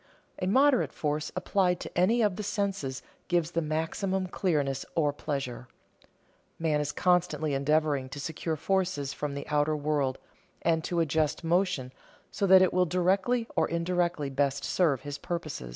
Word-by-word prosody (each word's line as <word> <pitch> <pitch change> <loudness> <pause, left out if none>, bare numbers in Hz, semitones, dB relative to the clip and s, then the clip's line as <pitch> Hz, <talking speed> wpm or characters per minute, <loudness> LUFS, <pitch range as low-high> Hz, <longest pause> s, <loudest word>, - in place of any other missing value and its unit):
A 185 - 0
moderate 265 +5 +4
force 150 0 -2
applied 180 -3 +1
to - - -8
any 220 +7 +3
of 205 -3 +2
the 210 - -4
senses 195 -10 -2 0.2
gives 170 -2 +1
the 170 - 0
maximum 165 +5 -1
clearness 145 -8 -1
or 150 -3 +2
pleasure. 140 -4 -4 0.9
Man 155 -2 +1
is 145 0 -2
constantly 160 -5 +1
endeavoring 140 -1 +1
to 145 - -7
secure 160 +2 -3
forces 175 -5 -1
from 145 -1 -4
the 140 - -6
outer 150 +1 +2
world 145 -3 0 0.5
and 160 -1 +2
to 175 -1 0
adjust 155 -1 0
motion 165 -7 0 0.4
so 200 - 0
that 190 0 +8
it 185 - +2
will 180 0 +3
directly 190 +7 +1
or - - +2
indirectly 170 -3 -1
best 140 0 0
serve 155 -8 +1
his 145 -1 -6
purposes. 155 - -5
160 Hz, 155 wpm, -29 LUFS, 145-185 Hz, 0.9 s, that